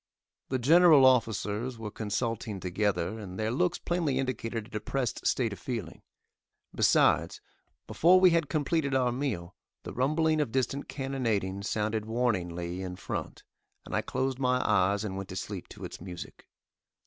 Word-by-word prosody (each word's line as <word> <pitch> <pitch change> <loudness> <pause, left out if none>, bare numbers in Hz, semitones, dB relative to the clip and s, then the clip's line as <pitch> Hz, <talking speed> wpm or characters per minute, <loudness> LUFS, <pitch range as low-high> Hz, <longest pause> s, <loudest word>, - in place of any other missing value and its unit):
The 130 - 0
general 155 +2 +6
officers 115 -1 +1
were 110 -2 -6
consulting 110 -1 -3
together, 95 +2 -1
and 95 -3 -8
their 110 0 -1
looks 175 +7 +1
plainly 165 -6 -1
indicated 115 -4 -2
a - - -16
depressed 120 +3 -2
state 115 -5 +1
of 95 - -10
feeling; 110 -9 -5 0.7
besides, - - +3 0.5
before 180 +3 +5
we 185 -1 +6
had 165 -3 +1
completed 145 -1 0
our 125 -2 +2
meal 120 -10 -3 0.3
the - - -7
rumbling 155 +4 +2
of 145 - -2
distant 135 +2 -1
cannonading 115 -9 -2
sounded 105 +1 -1
warningly 90 -7 -1
in 90 -1 -5
front, - - -5 0.4
and - - -4
I - - +2
closed 130 0 -2
my 125 -1 +2
eyes 100 0 +2
and 95 -3 -4
went 95 -1 -6
to 95 - -6
sleep 95 -1 -5
to - - -9
its - - -9
music. 90 -2 -9
115 Hz, 155 wpm, -29 LUFS, 100-135 Hz, 0.7 s, general